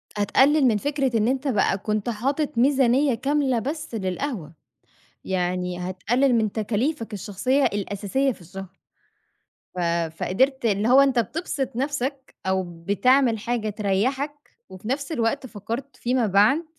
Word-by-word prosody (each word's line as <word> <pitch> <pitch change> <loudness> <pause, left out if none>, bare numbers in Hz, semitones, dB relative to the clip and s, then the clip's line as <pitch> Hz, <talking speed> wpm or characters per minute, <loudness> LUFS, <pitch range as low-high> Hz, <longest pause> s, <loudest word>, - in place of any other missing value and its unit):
هتقلِّل 265 +8 +4
من 220 -3 +3
فكرة 275 0 0
إن 215 0 +2
أنت 265 +3 0
بقى 200 -5 +2
كنت 210 +2 -2
حاطِط 275 +6 -1
ميزانيّة 265 +1 +3
كاملة 270 0 +1
بس 295 +2 -5
للقهوة، 190 - -3 0.7
يعني 180 -1 -1
هتقلِّل 220 +9 +1
من 220 -3 +1
تكاليفك 225 +3 -2
الشخصية 215 +7 0
الأساسية 205 +7 0
في 215 - -15
الشهر. 190 +2 -10 1.0
ف - - -4 0.4
فقدرت 265 +9 +1
اللي 210 0 +1
هو 265 +2 +7
أنت 270 -3 +3
بتبسط 275 -1 -3
نَفْسك، 270 0 -3
أو 190 0 +1 0.2
بتعمل 250 +2 +3
حاجة 230 -1 -2
تريّحك 215 +8 0 0.4
وفي 190 +2 -10
نَفْس 275 +4 -2
الوقت 260 0 0
فكّرت 235 +6 -6
فيما 245 -1 0
بعد، 210 - +4
235 Hz, 130 wpm, -24 LUFS, 205-275 Hz, 1.0 s, هو